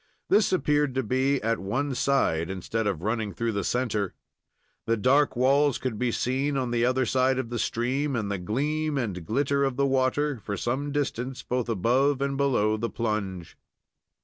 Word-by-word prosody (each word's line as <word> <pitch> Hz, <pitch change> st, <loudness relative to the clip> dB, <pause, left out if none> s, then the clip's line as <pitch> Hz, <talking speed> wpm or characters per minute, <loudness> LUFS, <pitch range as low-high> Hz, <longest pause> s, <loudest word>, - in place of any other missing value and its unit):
This 210 Hz, -, +4 dB
appeared 150 Hz, -6 st, +1 dB
to 130 Hz, -, +1 dB
be 130 Hz, +4 st, +1 dB
at 115 Hz, 0 st, 0 dB
one 125 Hz, +9 st, -2 dB
side, 120 Hz, -12 st, +1 dB
instead 105 Hz, +4 st, -2 dB
of 90 Hz, -5 st, -2 dB
running 110 Hz, -3 st, -2 dB
through 115 Hz, +4 st, -1 dB
the 100 Hz, -2 st, -2 dB
centre. 110 Hz, -4 st, -1 dB, 0.7 s
The 115 Hz, 0 st, +2 dB
dark 135 Hz, +7 st, +3 dB
walls 135 Hz, +2 st, +3 dB
could 120 Hz, -5 st, -4 dB
be 125 Hz, -1 st, +1 dB
seen 135 Hz, +5 st, 0 dB
on 125 Hz, -2 st, -1 dB
the 120 Hz, -1 st, +1 dB
other 130 Hz, +1 st, +2 dB
side 130 Hz, +2 st, +2 dB
of 125 Hz, -3 st, -3 dB
the 120 Hz, -, -2 dB
stream, 135 Hz, +6 st, -1 dB
and 105 Hz, -3 st, -2 dB
the 100 Hz, -, -2 dB
gleam 150 Hz, -, -1 dB
and 100 Hz, -9 st, -3 dB
glitter 140 Hz, -, +1 dB
of 135 Hz, -2 st, 0 dB
the 140 Hz, +1 st, +2 dB
water, 135 Hz, +1 st, +1 dB
for 100 Hz, -1 st, -3 dB
some 135 Hz, +8 st, -2 dB
distance 135 Hz, -3 st, -3 dB
both 125 Hz, -1 st, -2 dB
above 125 Hz, +7 st, +2 dB
and 140 Hz, 0 st, -1 dB
below 120 Hz, -6 st, +2 dB
the 115 Hz, +2 st, -2 dB
plunge. 100 Hz, -7 st, -3 dB
125 Hz, 180 wpm, -26 LUFS, 110-140 Hz, 0.7 s, This